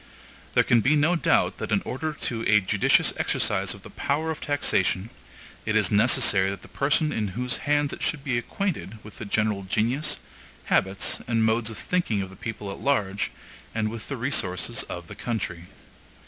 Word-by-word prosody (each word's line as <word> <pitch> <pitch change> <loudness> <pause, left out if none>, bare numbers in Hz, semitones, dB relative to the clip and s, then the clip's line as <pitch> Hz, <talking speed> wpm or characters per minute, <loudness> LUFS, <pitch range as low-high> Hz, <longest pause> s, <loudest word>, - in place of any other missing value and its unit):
There - - +6
can 120 -2 +4
be 140 +7 +3
no 155 +4 +3
doubt 165 - +2
that - - -4
in - - +2
order 155 +5 -3
to 120 -6 -3
a 105 0 +6
judicious 100 0 +3
exercise - - 0
of - - -15
the - - -11
power 155 +3 -1
of 160 - -6
taxation, 105 -7 +1 0.5
it 110 - -1
is 105 -4 +3
necessary 100 -3 +4
that 100 - -6
the - - -12
person 150 +2 +1
in 110 -7 -1
whose 125 +1 +1
hands 145 -1 +2
it - - -8
should 150 -4 -1
be 135 -4 -1
acquainted 165 - -3
with 110 - -12
the 110 - -5
general 105 0 0
genius, 115 +10 0 0.5
habits, 95 +1 +1
and 115 -2 +2
modes 110 0 +1
of 110 - -7
thinking 120 - 0
of 95 - -8
the - - -12
people 105 -1 -6
at - - -8
large, 100 -8 0 0.5
and 110 -1 0
with 115 -1 -7
the 140 - -3
resources 105 -8 0
of 85 -1 -6
the - - -10
country. 95 -7 -4
110 Hz, 190 wpm, -26 LUFS, 100-140 Hz, 0.5 s, There